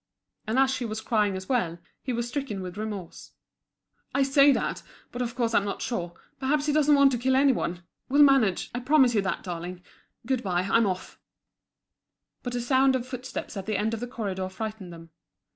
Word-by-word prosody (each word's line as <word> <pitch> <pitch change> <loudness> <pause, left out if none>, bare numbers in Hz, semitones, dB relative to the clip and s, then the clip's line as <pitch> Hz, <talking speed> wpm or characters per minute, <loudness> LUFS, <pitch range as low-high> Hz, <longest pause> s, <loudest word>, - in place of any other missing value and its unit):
And 220 +3 0
as 265 0 +4
she 260 - -2
was 220 -2 -3
crying 215 -3 +1
as 190 0 -6
well, 205 -11 0 0.2
he 255 - -3
was 235 0 -2
stricken 240 -7 -4
with 180 0 -7
remorse. 205 -4 -7 0.8
"I 280 - +4
say 275 +1 +6
that, - - -1 0.3
but 245 - -5
of 235 -1 -3
course 235 -3 0
I'm 205 - +4
not 200 - -4
sure. 175 -8 -3 0.3
Perhaps 285 +2 +1
he 300 - +1
doesn't 300 -1 +4
want 280 -1 +6
to 245 - -1
kill 260 +2 +2
any 275 +1 +5
one. 175 -8 -3 0.3
We'll 285 +2 +6
manage. 265 -10 +3
I 245 - -2
promise 260 -1 +4
you 210 - +3
that, 190 - -3
darling. 175 0 -6 0.4
Good 260 0 0
bye, 180 -4 0
I'm 215 +3 +3
off." 185 -1 -5 1.2
But 245 -1 -4
a 245 - -1
sound 265 +2 +3
of 250 -2 -2
footsteps 255 -1 -6
at 195 -1 -6
the 215 -2 0
end 220 +3 0
of 225 - -2
the 245 - -4
corridor 190 -6 -4
frightened 210 -1 -6
them. 165 -1 -12
235 Hz, 205 wpm, -27 LUFS, 195-265 Hz, 1.2 s, say